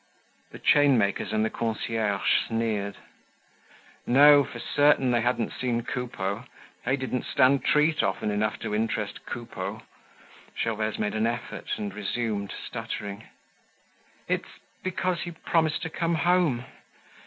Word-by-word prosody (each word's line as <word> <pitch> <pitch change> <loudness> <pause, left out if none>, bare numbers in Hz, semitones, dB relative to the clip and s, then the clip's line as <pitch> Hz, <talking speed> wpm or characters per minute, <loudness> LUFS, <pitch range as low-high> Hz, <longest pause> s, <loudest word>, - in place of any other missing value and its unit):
The - - -10
chainmakers 130 -11 +3
and 110 0 +1
the - - -2
concierge 110 -3 -1 0.2
sneered. 110 -3 -1 1.1
No, 145 +3 +8
for 125 - -8
certain, 135 +1 +3
they 120 -1 +2
hadn't 120 -1 0
seen 120 -2 -1
Coupeau. 115 -3 -3 0.4
They 130 +3 +2
didn't 130 -1 -2
stand 135 +1 +3
treat 150 +1 +3
often 95 +2 -1
enough 105 +1 0
to - - -3
interest 105 -1 -2
Coupeau. 120 -1 -5 0.8
Gervaise 110 -1 -1
made 105 - -1
an 110 +1 +1
effort 120 0 -4
and 100 -2 -4
resumed, 105 0 -2
stuttering: 100 +2 -5 1.0
"It's - - -2 0.3
because 185 -1 -1
he - - -4
promised 160 0 0
to 160 - -4
come 170 +1 0
home. 165 -7 +2
120 Hz, 125 wpm, -27 LUFS, 110-145 Hz, 1.1 s, No